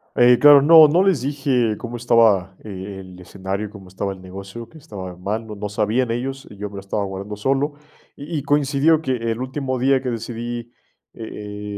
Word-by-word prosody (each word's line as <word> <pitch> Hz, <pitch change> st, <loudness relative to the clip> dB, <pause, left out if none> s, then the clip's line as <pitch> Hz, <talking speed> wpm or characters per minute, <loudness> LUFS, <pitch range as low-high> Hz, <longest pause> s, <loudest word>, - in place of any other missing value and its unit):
Eh, 120 Hz, 0 st, +6 dB
claro, 145 Hz, -1 st, +8 dB
no 160 Hz, +1 st, +8 dB
no 165 Hz, +5 st, +3 dB
les 190 Hz, -9 st, +2 dB
dije 130 Hz, -5 st, 0 dB
cómo 120 Hz, 0 st, -6 dB
estaba, 110 Hz, -6 st, +3 dB
eh, 100 Hz, -1 st, -7 dB
el 95 Hz, -1 st, -12 dB
escenario, 95 Hz, +3 st, -5 dB
cómo 100 Hz, -3 st, -13 dB
estaba 95 Hz, +2 st, -4 dB
el 95 Hz, -, -14 dB
negocio, 95 Hz, +5 st, -9 dB
qué 160 Hz, -, -15 dB
estaba 95 Hz, -, -9 dB
mal, 105 Hz, +5 st, -4 dB
no 105 Hz, -, -7 dB
no 105 Hz, 0 st, -5 dB
sabían 110 Hz, +4 st, 0 dB
ellos, 135 Hz, +3 st, -4 dB
y 105 Hz, -, -13 dB
yo 105 Hz, +1 st, -5 dB
me 100 Hz, -, -12 dB
lo 100 Hz, -, -6 dB
estaba 100 Hz, +1 st, -3 dB
guardando 100 Hz, +1 st, -6 dB
solo, 135 Hz, +7 st, 0 dB, 0.4 s
y 155 Hz, +3 st, -6 dB
y 140 Hz, -, -3 dB
coincidió 145 Hz, +2 st, +2 dB
que 135 Hz, -, -6 dB, 0.2 s
el 115 Hz, +2 st, -4 dB
último 130 Hz, 0 st, -3 dB
día 135 Hz, +1 st, +2 dB
que 130 Hz, -, -2 dB
decidí, 120 Hz, +1 st, -5 dB, 0.4 s
eh 105 Hz, -2 st, -7 dB
115 Hz, 200 wpm, -21 LUFS, 100-135 Hz, 0.4 s, claro